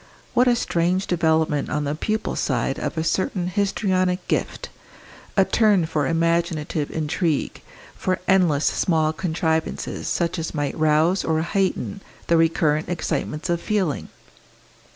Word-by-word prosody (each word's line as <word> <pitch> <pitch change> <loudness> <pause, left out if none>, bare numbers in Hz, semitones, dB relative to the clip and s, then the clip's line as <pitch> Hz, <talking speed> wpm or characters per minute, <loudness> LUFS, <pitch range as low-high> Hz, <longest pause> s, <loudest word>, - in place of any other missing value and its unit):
What 250 +1 +4
a 245 - +5
strange 180 -2 0
development 160 -4 +1
on 150 0 -1
the 145 0 -1
pupil's 215 +8 -2
side - - -1
of - - -4
a 160 - 0
certain 185 +1 0
histrionic 185 -1 0
gift, - - -2 0.7
a 195 - +6
turn 200 -2 +3
for 155 -3 -1
imaginative 165 -2 0
intrigue, 160 0 -1 0.3
for 185 0 -1
endless 175 -6 +3
small 160 -3 +1
contrivances 160 -2 -2
such 170 0 -1
as 160 0 -4
might 145 -2 -1
rouse 155 +4 +2
or 160 -1 +1
heighten 195 +2 -1 0.2
the 170 - +2
recurrent 160 -1 +2
excitements 155 -2 -2
of 170 -1 0
feeling! 190 -8 -1
165 Hz, 130 wpm, -23 LUFS, 155-185 Hz, 0.7 s, a